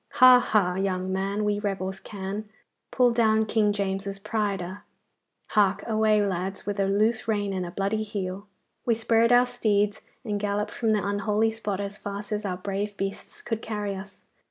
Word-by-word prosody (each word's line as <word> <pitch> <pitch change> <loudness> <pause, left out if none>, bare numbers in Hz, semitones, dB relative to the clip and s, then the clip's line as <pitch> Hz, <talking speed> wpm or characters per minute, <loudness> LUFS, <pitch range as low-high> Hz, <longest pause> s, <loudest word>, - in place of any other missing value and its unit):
Ha, 255 0 +8
ha, 200 -7 +2
young 190 -1 -1
man, 195 +2 -1
we 205 0 +1
rebels 195 -2 -3
can 200 +1 -5 0.4
Pull 245 -1 +3
down 220 -2 +3
King 215 -1 +2
James's 195 0 -2
pride 210 -1 -1
a!" 185 +3 -6 0.7
Hark 205 -2 +2
away, 215 -2 +3
lads, 190 0 -3
with 205 0 -3
a 195 - +3
loose 220 +4 +1
rein 205 -3 0
and 185 -2 -2
a - - -5
bloody 200 +4 -1
heel!' 200 -2 -4 0.4
We 235 - +2
spurred 230 +1 +3
our 245 0 +6
steeds 210 -4 0 0.2
and 205 -2 -1
galloped 205 +1 -1
from 225 - -1
the 210 -2 +2
unholy 210 +2 +1
spot 210 -3 -3
as 200 +1 -5
fast 205 +1 -6
as 210 0 -2
our 185 -2 -2
brave 200 +2 -3
beasts 195 0 -5
could 225 -1 -3
carry 210 -2 -3
us. 195 +1 -10
205 Hz, 180 wpm, -26 LUFS, 195-220 Hz, 0.7 s, Ha